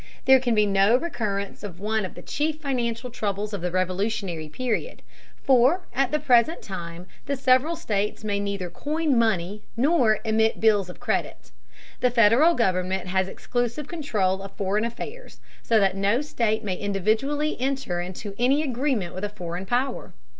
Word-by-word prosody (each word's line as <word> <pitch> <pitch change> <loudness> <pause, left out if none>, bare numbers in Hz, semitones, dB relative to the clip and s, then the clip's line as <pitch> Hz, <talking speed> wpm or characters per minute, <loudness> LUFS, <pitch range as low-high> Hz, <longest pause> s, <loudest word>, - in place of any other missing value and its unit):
There 265 0 +7
can 245 -3 0
be 210 0 +4
no 200 +3 +4
recurrence 210 - -3
of 190 -4 -8
one 215 0 -1
of 185 - -8
the - - -10
chief 305 +1 -2
financial 245 -4 -2
troubles 210 -2 -3
of 200 - -3
the 180 - -1
Revolutionary 185 -2 -2
period, 255 - -3 0.4
for 265 +6 +4
at 270 -1 +1
the 300 - +1
present 255 +6 +3
time 170 -2 -7 0.2
the 280 - 0
several 265 +5 +3
states 210 -10 -2
may 205 -1 -1
neither 200 -3 -3
coin 305 -1 -1
money 210 -3 +1 0.2
nor 250 -5 +3
emit 220 0 +2
bills 205 -4 +3
of 180 - -10
credit. - - -3 0.5
The 250 - +3
Federal 240 +8 +5
government 185 -3 0
has 190 0 +1
exclusive 245 +7 -3
control 210 - -1
of 195 0 -9
foreign 205 +3 0
affairs, 435 - -7 0.2
so 225 -2 +3
that 195 -2 +2
no 200 +6 +2
state 230 -6 -1
may 190 -3 -2
individually 220 - 0
enter 265 -9 -1
into 185 +3 -6
any 270 +5 +3
agreement 255 - -1
with 185 - -6
a 205 - -1
foreign 180 -2 -6
power. 250 +5 -2
220 Hz, 165 wpm, -25 LUFS, 195-260 Hz, 0.5 s, There